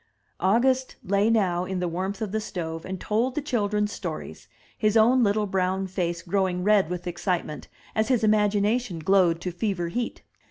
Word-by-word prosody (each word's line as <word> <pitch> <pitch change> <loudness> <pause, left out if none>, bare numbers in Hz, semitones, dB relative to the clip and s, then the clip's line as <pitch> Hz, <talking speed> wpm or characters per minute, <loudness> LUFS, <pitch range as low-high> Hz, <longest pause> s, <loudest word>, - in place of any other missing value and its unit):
August 255 +8 +2
lay 200 +3 +2
now 185 -6 +2
in 185 0 -3
the 180 - -1
warmth 190 +5 -3
of 210 - -4
the 220 +1 -1
stove 165 -5 -5
and 190 0 -5
told 235 +7 0
the - - +1
children 210 -7 0
stories, 205 - -6 0.3
his 215 0 +2
own 240 +4 +5
little 210 0 +2
brown 190 0 0
face 175 -2 -3
growing 185 -1 0
red 205 -4 +4
with 180 0 -4
excitement 175 -3 -3 0.3
as 220 0 +1
his 250 -4 +2
imagination 210 0 +2
glowed 170 0 +3
to 180 - -4
fever 175 -2 -2
heat. 240 +7 -4
195 Hz, 170 wpm, -25 LUFS, 180-215 Hz, 0.3 s, own